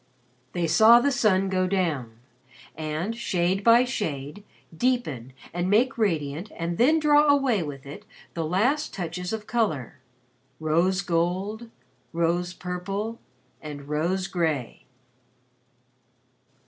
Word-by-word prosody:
They 175 -1 0
saw 220 +9 +7
the 285 +4 +1
sun 195 -6 +2
go 185 -1 +1
down 155 -12 -1 0.6
and, 160 +7 -3
shade 190 -4 0
by 235 +3 +6
shade, 160 - -4 0.3
deepen 160 - -1 0.2
and 175 +1 -1
make 240 +6 +3
radiant 165 -4 -1
and 170 +1 -3
then 290 +7 +5
draw 300 -1 +4
away 275 -8 +3
with 140 -4 -7
it 175 +10 -10 0.3
the 165 - -2
last 240 - 0
touches 180 0 -4
of 220 -1 -4
color 205 - -1 0.6
rose 170 +5 +1
gold, 185 +7 -1 0.4
rose 170 +1 0
purple, 195 +6 -4 0.4
and 145 -2 -8
rose 170 +6 -1
gray. 160 -10 -2
185 Hz, 115 wpm, -25 LUFS, 160-220 Hz, 0.6 s, saw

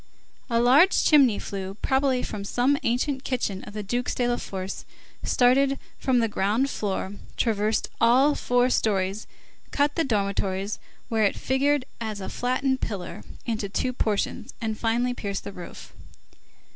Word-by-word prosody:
A 230 -1 +2
large 270 +10 +5
chimney 270 -9 +5
flue, 195 -1 -5
probably 265 -2 +2
from 205 -2 -5
some 245 +7 +2
ancient 260 +3 0
kitchen 220 -8 -2
of 210 - -10
the 210 - -3
Dukes 245 +5 -2
de 245 - +1
la 240 0 +1
Force, 190 0 -5 0.4
started 270 +2 +3 0.2
from 260 -2 +2
the 230 -1 +3
ground 220 +6 0
floor, 195 -1 -2 0.2
traversed 215 -1 +1
all 260 +5 +5
four 245 -2 +2
stories, 195 -2 0 0.4
cut 290 0 +1
the 330 - +1
dormitories, 200 -4 -1 0.3
where 225 -1 0
it 200 - +1
figured 275 +1 +1
as 220 -3 -4
a 190 - -5
flattened 260 +2 0
pillar, 195 -5 -4 0.2
into 220 -4 -2
two 255 +5 -1
portions, 220 +2 -2
and 220 -2 -2
finally 240 +2 +1
pierced 200 -4 -4
the 200 - -7
roof. 175 - -10
235 Hz, 150 wpm, -25 LUFS, 205-260 Hz, 0.4 s, large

